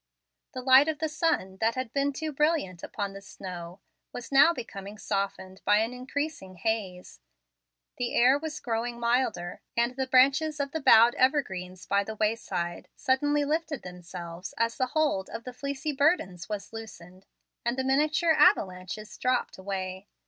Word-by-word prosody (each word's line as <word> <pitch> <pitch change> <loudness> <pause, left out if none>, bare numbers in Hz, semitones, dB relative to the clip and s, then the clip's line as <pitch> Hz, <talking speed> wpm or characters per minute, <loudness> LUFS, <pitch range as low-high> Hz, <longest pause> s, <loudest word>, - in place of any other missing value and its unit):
The 255 -1 -5
light 265 +3 +7
of 315 -1 -1
the 315 +2 -1
sun, 300 - -1
that 225 +3 +1
had 255 -3 -4
been 280 0 +1
too 310 +3 -4
brilliant 295 - 0
upon 200 -2 -4
the 195 - -9
snow, 180 -1 -9 0.3
was 245 +2 -8
now 275 +5 +7
becoming 210 - -7
softened 195 -2 -3
by 205 +1 +4
an 225 +3 0
increasing 255 -5 -4
haze. 185 - -3 0.8
The 245 -1 -2
air 255 +4 +5
was 310 0 -5
growing 235 0 -3
milder, 235 -7 0 0.2
and 240 +2 +1
the 265 0 -2
branches 280 +4 +4
of 280 -1 -2
bowed 240 -6 +6
evergreens 190 -10 0
by 200 0 +2
the 220 +2 -6
wayside 200 -6 -2
suddenly 290 +2 +1
lifted 305 -2 -2
themselves 180 0 -8
as 230 0 +1
the 255 - 0
hold 290 -12 +1
of 230 - -6
the 250 - -7
fleecy 280 +3 -3
burdens 270 - +1
was 210 +1 -5
loosened, 185 -5 -10 0.4
and 235 +2 -1
the 265 - 0
miniature 305 +5 +3
avalanches 205 - +1
dropped 250 -5 0
away. 190 0 -5
235 Hz, 155 wpm, -28 LUFS, 190-280 Hz, 0.8 s, light